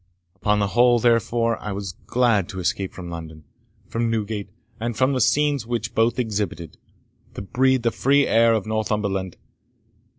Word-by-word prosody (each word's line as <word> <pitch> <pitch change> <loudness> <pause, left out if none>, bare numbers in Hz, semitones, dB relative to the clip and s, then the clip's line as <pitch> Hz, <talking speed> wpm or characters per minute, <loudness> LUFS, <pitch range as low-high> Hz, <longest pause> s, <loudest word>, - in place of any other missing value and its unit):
Upon 105 +1 +1
the 100 -1 0
whole, 120 +2 +4
therefore, 115 0 +1
I 105 - -4
was 100 -1 -5 0.2
glad 115 -7 +2
to 95 - -6
escape 95 +1 -1
from 90 -2 -8
London, 80 -2 -8 0.4
from 115 0 -1
Newgate, 105 -2 -3 0.3
and 115 -1 -3
from 130 +2 +2
the 130 - 0
scenes 145 -1 +2
which 115 -1 -3
both 115 +1 +2
exhibited, 105 -8 -3 0.6
to - - -5
breathe 130 +4 +1
the 115 - +2
free 140 +4 +3
air 115 0 +4
of 110 - -2
Northumberland. 105 -4 -2
110 Hz, 160 wpm, -23 LUFS, 100-120 Hz, 0.6 s, whole